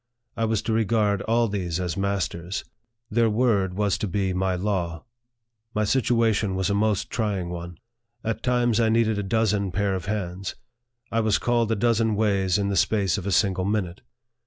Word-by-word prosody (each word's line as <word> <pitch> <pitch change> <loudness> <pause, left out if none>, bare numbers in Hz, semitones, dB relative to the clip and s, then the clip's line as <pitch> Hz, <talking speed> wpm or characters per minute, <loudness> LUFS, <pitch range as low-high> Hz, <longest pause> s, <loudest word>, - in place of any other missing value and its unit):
I 115 - 0
was 110 -1 0
to 115 - -1
regard 110 -2 +2
all 115 +1 +3
these 90 -5 -2
as 90 -2 -2
mas 100 -3 0
ters. 85 +3 -6 0.5
Their 115 +1 +3
word 105 -5 +1
was 100 -1 0
to 105 - -1
be 95 0 -1
my 95 0 0
law. 90 -4 -2 0.7
My 105 - +2
situation 110 -4 +2
was 95 +1 0
a - - +2
most 105 -1 0
trying 100 -6 -1
one. 85 -1 -7 0.5
At 115 0 -2
times 120 -2 +2
I 115 -1 +3
needed 110 -2 +2
a - - 0
dozen 105 -2 0
pair 100 +2 0
of 95 -3 -3
hands. 95 -2 -3 0.6
I 115 - +1
was 110 -2 +2
called 120 -2 +1
a - - +2
dozen 115 0 +2
ways 100 -3 +2
in 100 -1 0
the 100 - -1
space 100 0 +2
of 100 - -6
a - - 0
single 95 0 +2
minute. 100 -3 -2
100 Hz, 185 wpm, -25 LUFS, 95-110 Hz, 0.7 s, all